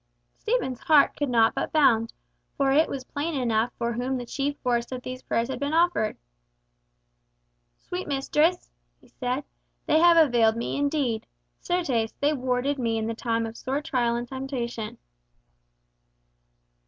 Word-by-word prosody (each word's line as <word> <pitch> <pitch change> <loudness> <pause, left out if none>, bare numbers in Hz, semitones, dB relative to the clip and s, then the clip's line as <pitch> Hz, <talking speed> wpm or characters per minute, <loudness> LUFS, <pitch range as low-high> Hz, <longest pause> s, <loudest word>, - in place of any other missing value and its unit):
Stephen's 435 - -1
heart 300 -3 +4
could 290 -2 -2
not 230 -2 +4
but - - -3
bound, 230 -7 +3 0.5
for 275 -1 +2
it 310 +4 +4
was 270 -2 -4
plain 290 +2 -3
enough 235 -1 +1
for 235 0 -1
whom 250 +3 -2
the 245 - -5
chief 285 +3 -2
force 240 -1 0
of 250 -1 -5
these 255 0 -6
prayers 230 0 -1
had 260 -2 -4
been 285 +2 -1
offered. 335 -10 +2 1.6
"Sweet 360 +1 -6
mistress," 300 +5 +1 0.3
he - - -22
said, 255 +2 -3 0.4
"they 310 - +3
have 340 0 +6
availed 240 -8 +4
me 235 - -3
indeed. 280 -6 -1 0.3
Certes, 270 -11 -1
they 290 +2 +2
warded 260 +1 -1
me 230 -2 0
in 220 - -1
the 230 - -2
time 230 0 -1
of 225 0 -7
sore 265 +4 -2
trial 245 -6 0
and 240 +1 -3
temptation." 245 -4 -5
255 Hz, 155 wpm, -26 LUFS, 235-290 Hz, 1.6 s, have